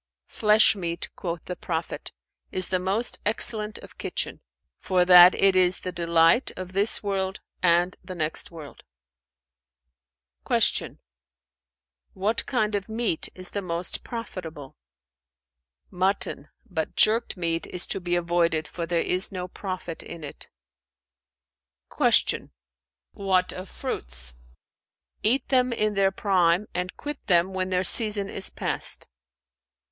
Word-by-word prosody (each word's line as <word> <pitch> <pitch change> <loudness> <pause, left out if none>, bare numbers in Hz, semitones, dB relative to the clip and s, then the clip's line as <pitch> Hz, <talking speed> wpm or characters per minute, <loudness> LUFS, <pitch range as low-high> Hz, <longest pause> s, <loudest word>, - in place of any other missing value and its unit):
"'Flesh 215 +1 +5
meat' 170 -3 -4
(quoth 170 -2 -5
the 180 - -5
Prophet) 165 -2 -5 0.4
'is 185 -1 0
the 185 - +1
most 195 +6 -1
excellent 215 0 0
of - - -15
kitchen; - - -2 0.4
for 180 -1 +1
that 180 0 +9
it 195 -1 +3
is 185 0 +3
the 185 - -4
delight 170 +5 +3
of 185 0 -7
this 200 +3 +3
world 195 -1 -2 0.2
and 175 +1 +3
the 185 - -8
next 155 -2 -2
world.'" 160 -4 -12 1.6
Q - - +1 1.2
"What 210 +4 -1
kind 220 -5 0
of 200 0 -2
meat 220 -7 -2
is 185 -1 -8
the 200 - -3
most 170 -1 -3
profitable?" 175 - -8 1.2
"Mutton; 185 -5 -1 0.2
but 165 -6 -4
jerked 225 -1 +3
meat 165 -1 -2
is 180 - -1
to 195 - -1
be 175 0 -1
avoided, 170 -2 0
for 170 -1 -5
there 170 -1 +1
is 185 +1 -1
no 180 -1 -5
profit 185 -3 -6
in 170 -2 -10
it." 145 - -9 1.5
Q - - +2 0.6
"What 185 -2 0
of 185 +1 -8
fruits?" - - -5 0.9
"Eat 245 +4 +1
them 255 -2 +3
in 215 -2 0
their 195 -1 +3
prime 185 -1 +2
and 180 +1 -4
quit 295 -1 -5
them 180 +1 +3
when 185 0 -2
their 185 0 +1
season 205 0 +4
is 190 - 0
past." - - -4
185 Hz, 130 wpm, -25 LUFS, 170-200 Hz, 1.6 s, that